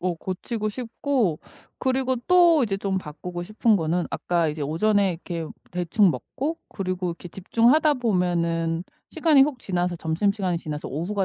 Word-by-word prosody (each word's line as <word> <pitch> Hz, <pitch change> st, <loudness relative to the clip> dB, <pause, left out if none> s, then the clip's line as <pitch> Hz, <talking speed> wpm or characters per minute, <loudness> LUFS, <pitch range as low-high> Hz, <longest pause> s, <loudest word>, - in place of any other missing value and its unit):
어 180 Hz, 0 st, -1 dB
고치고 210 Hz, +5 st, -4 dB
싶고 235 Hz, -, -1 dB, 0.4 s
그리고 260 Hz, 0 st, 0 dB
또 345 Hz, -4 st, +6 dB
이제 205 Hz, -5 st, 0 dB
좀 195 Hz, -1 st, -1 dB
바꾸고 175 Hz, +2 st, -7 dB
싶은 215 Hz, +3 st, +2 dB
거는 170 Hz, 0 st, 0 dB
아까 170 Hz, -2 st, 0 dB
이제 150 Hz, 0 st, -5 dB
오전에 195 Hz, +6 st, +2 dB
이렇게 165 Hz, -1 st, -5 dB, 0.2 s
대충 180 Hz, +2 st, +2 dB
먹고 305 Hz, -, -4 dB
그리고 185 Hz, -2 st, -3 dB
이렇게 170 Hz, +1 st, -7 dB
집중하다 240 Hz, -, +3 dB
보면은 170 Hz, -7 st, 0 dB, 0.2 s
시간이 310 Hz, -4 st, +4 dB
훅 280 Hz, -2 st, 0 dB
지나서 180 Hz, -4 st, -1 dB
점심시간이 180 Hz, +2 st, 0 dB
지나서 150 Hz, -2 st, -5 dB
오후가 190 Hz, +7 st, -2 dB
185 Hz, 345 characters per minute, -24 LUFS, 170-235 Hz, 0.4 s, 또